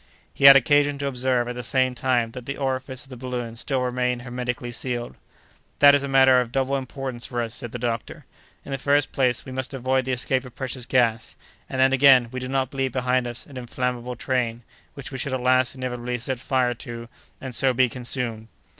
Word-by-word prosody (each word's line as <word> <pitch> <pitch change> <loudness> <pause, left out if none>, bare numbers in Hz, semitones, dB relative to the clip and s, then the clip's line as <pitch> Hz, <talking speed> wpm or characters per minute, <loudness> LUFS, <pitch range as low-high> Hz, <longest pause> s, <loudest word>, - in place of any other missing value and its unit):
He 140 - 0
had 140 0 +12
occasion 145 +2 +3
to 140 - -4
observe, 125 -2 0
at 125 - -3
the 125 - -6
same 130 +1 +1
time, 120 -2 0
that 125 +1 -9
the 140 - -4
orifice 130 0 -3
of 135 - -16
the 130 - -8
balloon 120 -2 -5
still 130 +3 -1
remained 125 -1 -1
hermetically 125 -1 -4
sealed. 120 0 -4 0.6
"That 145 0 +8
is 140 - +3
a 140 - -3
matter 130 -1 +5
of 120 -2 -5
double 135 +1 0
importance 130 -2 -4
for 120 - -4
us," 115 -1 -3
said 120 -1 -5
the 120 - -5
doctor; 115 -1 -4 0.4
"in - - -8
the 135 - -2
first 145 +1 +2
place, 125 -5 +1
we 130 - -8
avoid 130 0 -1
the 130 - -2
escape 130 +1 0
of 125 -2 -12
precious 130 -2 -4
gas, 115 -3 +1 0.3
and 130 - -4
then, 130 0 +4
again, 130 -3 +6
we 130 - -4
do 130 - -5
not 135 0 -1
leave 135 -2 -1
behind 125 -1 0
us 120 0 -6
an 140 - -12
inflammable 125 0 -3
train, 120 -2 -2 0.3
which 130 -4 -8
we 130 - -6
should 130 +1 -2
at - - -2
last 130 0 +2
inevitably 125 -1 -4
set 125 +1 -3
fire 125 -2 +1
to, 115 0 -8 0.3
and 130 -2 -7
so 130 +3 +4
be 130 +1 +3
consumed." 120 -2 -3
125 Hz, 215 wpm, -24 LUFS, 120-130 Hz, 0.6 s, had